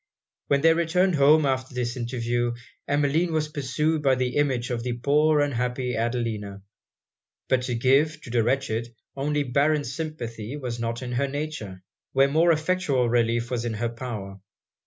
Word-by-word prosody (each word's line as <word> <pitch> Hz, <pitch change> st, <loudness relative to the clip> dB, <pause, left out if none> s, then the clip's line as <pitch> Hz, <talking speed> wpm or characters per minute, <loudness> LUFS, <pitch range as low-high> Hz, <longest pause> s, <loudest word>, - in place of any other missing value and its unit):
When 140 Hz, -1 st, +2 dB
they 165 Hz, +1 st, +6 dB
returned 175 Hz, +3 st, +2 dB
home 150 Hz, +1 st, +5 dB
after 130 Hz, -1 st, -1 dB
this 120 Hz, -1 st, -2 dB
interview, 120 Hz, -1 st, -1 dB, 0.3 s
Emmeline 150 Hz, +4 st, +1 dB
was 155 Hz, -1 st, 0 dB
pursued 150 Hz, +2 st, -1 dB
by 135 Hz, -2 st, +3 dB
the 125 Hz, -1 st, -1 dB
image 130 Hz, -4 st, 0 dB
of 120 Hz, -1 st, -2 dB
the 120 Hz, +1 st, -2 dB
poor 150 Hz, +5 st, +3 dB
unhappy 125 Hz, -2 st, -1 dB
Adelina. 110 Hz, -4 st, -3 dB, 0.8 s
But 130 Hz, -1 st, +2 dB
to 120 Hz, -, 0 dB
give, 140 Hz, +6 st, +3 dB
to 125 Hz, -, -10 dB
the 120 Hz, -1 st, +3 dB
wretched, 120 Hz, -1 st, -1 dB, 0.2 s
only 145 Hz, +2 st, 0 dB
barren 145 Hz, +3 st, +2 dB
sympathy, 125 Hz, -4 st, -5 dB
was 125 Hz, -4 st, -5 dB
not 115 Hz, +2 st, -3 dB
in 125 Hz, -, -5 dB
her 135 Hz, +3 st, 0 dB
nature, 135 Hz, -10 st, -5 dB, 0.3 s
where 135 Hz, +1 st, +5 dB
more 160 Hz, +4 st, +4 dB
effectual 155 Hz, -6 st, +1 dB
relief 120 Hz, 0 st, +1 dB
was 120 Hz, -2 st, -1 dB
in 115 Hz, -2 st, -2 dB
her 120 Hz, +2 st, -1 dB
power. 110 Hz, -5 st, -6 dB
130 Hz, 160 wpm, -25 LUFS, 120-150 Hz, 0.8 s, they